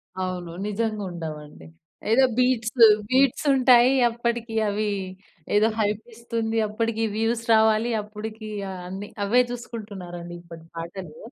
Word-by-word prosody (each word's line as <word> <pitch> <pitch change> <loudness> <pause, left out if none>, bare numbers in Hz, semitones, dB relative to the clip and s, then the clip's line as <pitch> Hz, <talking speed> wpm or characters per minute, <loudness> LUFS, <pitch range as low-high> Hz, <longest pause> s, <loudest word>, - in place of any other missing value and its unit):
అవును. 185 -2 -4
నిజంగుండవండి. 185 -9 -4 0.5
ఏదో 265 +3 +5
బీట్స్ 250 -3 +1 0.4
బీట్సుంటాయి. 260 -1 +4 0.2
అప్పటికీ 235 -1 -3
అవీ 210 +1 -1 0.7
ఏదో 215 +2 +5
హైపిస్తుంది. 225 +1 -3
అప్పడికి 225 +1 -2
వ్యూస్ 225 +1 0
రావాలి. 220 +1 +3
అప్పుడికీ 215 +1 -8 0.2
ఆహ్, 185 -1 -7
అన్నీ 195 +2 -6 0.2
అవే 245 +5 +4
చూసుకుంటున్నారండి 195 -8 -7
ఇప్పటి 165 -1 -12
పాటలూ. 170 -1 -7
220 Hz, 100 wpm, -24 LUFS, 190-235 Hz, 0.7 s, ఏదో